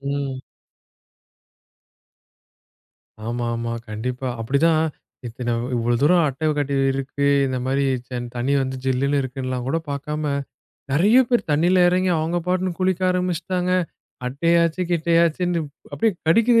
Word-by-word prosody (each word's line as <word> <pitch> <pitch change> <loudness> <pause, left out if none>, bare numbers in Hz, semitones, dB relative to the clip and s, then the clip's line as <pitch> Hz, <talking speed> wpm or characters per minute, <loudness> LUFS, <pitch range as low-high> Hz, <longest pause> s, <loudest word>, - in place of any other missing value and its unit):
ம். 140 -1 -3 2.9
ஆமா, 120 0 -2
ஆமா, 115 0 -3 0.2
கண்டிப்பா. 125 +4 -4
அப்படிதான். 155 +7 +2 0.4
இத்தன 120 +1 -3 0.2
இவ்வளவு 120 0 0
தூரம் 170 +2 +5
அட்டை 150 +4 -2
கட்டி 140 -1 -1 0.2
இருக்கு, 135 +1 -2 0.2
இந்த 130 -1 -2
மாதிரி 135 +1 +1 0.5
தண்ணி 125 +3 -1
வந்து 130 0 -3
ஜில்லுன்னு 140 +2 +1
இருக்குன்னெல்லாம் 130 -1 -4
கூட 165 - +1
பார்க்காம 150 +1 -3 0.6
நெறைய 205 - +5
பேர் 240 -2 +2
தண்ணியில 175 +5 +3
இறங்கி 185 +1 +2
அவுங்க 165 +3 0
பாட்டுக்கு 185 -1 -1
குளிக்க 185 -1 +1
ஆரம்பிச்சிட்டாங்க. 180 0 -1 0.5
அட்டையாச்சு, 170 +6 +2
கிட்டையாச்சுனு 170 +1 +2 0.3
அப்படியே 225 -2 +1
கடிக்குது 230 +7 +5
150 Hz, 110 wpm, -22 LUFS, 130-175 Hz, 2.9 s, தூரம்